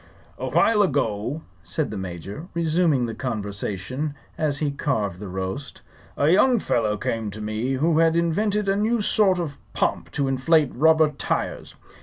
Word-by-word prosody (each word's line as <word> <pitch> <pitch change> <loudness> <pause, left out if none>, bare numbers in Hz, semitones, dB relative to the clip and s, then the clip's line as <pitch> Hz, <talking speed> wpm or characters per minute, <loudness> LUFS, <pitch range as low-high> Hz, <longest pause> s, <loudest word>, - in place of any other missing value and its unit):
"A - - -3
while 225 -2 +4
ago," 140 - 0 0.2
said 155 - -2
the - - -5
Major, 95 - -6
resuming 165 -5 +2
the 115 - -4
conversation 110 +4 -3 0.2
as 150 -3 -1
he 145 -1 0
carved 105 -10 -1
the 105 - -6
roast, 95 +8 -5 0.3
"a 145 - +2
young 240 +8 +5
fellow 110 - 0
came 110 +1 -2
to 105 +2 -8
me 110 +5 -2
who 155 +4 +2
had 165 0 +4
invented 200 +5 +1
a 195 - +3
new 220 +3 +1
sort 200 -2 +3
of 160 -5 -4
pump - - 0
to 140 -2 0
inflate 135 +3 +3
rubber 155 +2 +4
tires. 145 - -3
140 Hz, 160 wpm, -24 LUFS, 110-165 Hz, 0.3 s, young